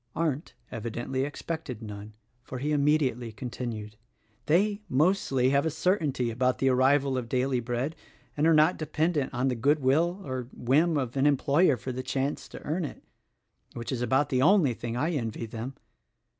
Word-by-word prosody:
Arndt 155 -1 -2 0.2
evidently 120 +3 -3
expected 145 -5 -5
none, 105 0 -8 0.3
for 130 - -7
he 145 +4 -2
immediately 140 -5 +1
continued: 110 -2 -6 0.5
"They, 200 +6 +2
mostly, 135 -4 +2
have 140 0 +3
a 160 - +1
certainty 150 - 0
about 125 +2 +1
the 135 - +2
arrival 135 +1 +3
of 115 -2 -7
daily 130 0 +1
bread 120 +6 -2 0.4
and 150 +2 +2
are 165 - +5
not 155 +4 +4
dependent 155 -1 0
on 125 +1 0
the 130 - +1
good 140 +6 +2
will 160 +7 +2
or 130 -2 -4
whim 150 +6 +2
of 130 -3 -2
an 135 +2 +4
employer 145 +1 +3
for 130 +4 -5
the 130 +1 -4
chance 135 +2 -2
to - - -11
earn 165 +4 -1
it 150 - -7 0.4
— - - -35
which 120 +2 -5
is 125 -2 -2
about 130 +4 +2
the 130 -2 +1
only 170 -5 +5
thing 120 +1 -5
I 155 +6 0
envy 115 -6 -3
them. 115 +4 -6
135 Hz, 175 wpm, -28 LUFS, 125-150 Hz, 0.5 s, are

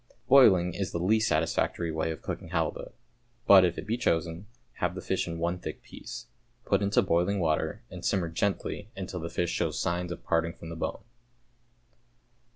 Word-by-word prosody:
Boiling 95 -10 +6
is 95 -1 -3
the - - -2
least 110 +6 +2
satisfactory 85 -2 0
way 80 0 -1
of 80 - -6
cooking - - -5
halibut, 80 -2 -2 0.5
but 95 -2 +8
if 85 -1 +1
it - - -5
be 115 +2 -1
chosen, 85 -1 -1 0.3
have - - 0
the - - -4
fish - - -1
in 85 0 -4
one 85 +2 -1
thick - - -7
piece. - - -9 0.4
Put 100 0 +2
into 100 0 +3
boiling 95 +2 +1
water, 80 +6 0
and 90 -1 -8
simmer 90 -4 +1
gently 100 +4 -2
until 95 -1 -5
the 85 0 -5
fish 85 0 -1
shows 80 -3 -1
signs 90 0 -1
of - - -7
parting 85 0 0
from 80 - -10
the 85 - -6
bone. 80 - -4
85 Hz, 180 wpm, -28 LUFS, 85-100 Hz, 0.5 s, but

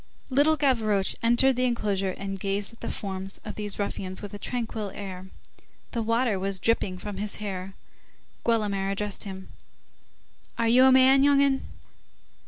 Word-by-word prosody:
Little 295 +4 +3
Gavroche 220 -9 +4
entered 240 +3 +3
the 255 - +2
enclosure 205 -5 0
and 195 +1 -5
gazed 200 +3 -2
at 230 - -19
the - - -4
forms 195 -1 -5
of 210 - -5
these 205 -1 -5
ruffians 190 -2 -3
with 205 -1 -8
a 205 - -7
tranquil 225 -3 -3
air. 190 -1 -8 0.6
The 235 - -2
water 230 -2 +1
was 195 0 -2
dripping 190 -3 +1
from 205 +1 -7
his 210 +1 -2
hair. 195 -2 -6 0.7
Guelemer 205 -4 0
addressed 205 +1 -3
him:— 190 -1 -8 1.1
"Are 230 - +1
you 250 +3 +6
a 265 - +7
man, 260 +1 +6
young 280 0 +4
'un?" 275 -1 +2
210 Hz, 160 wpm, -26 LUFS, 195-240 Hz, 1.1 s, a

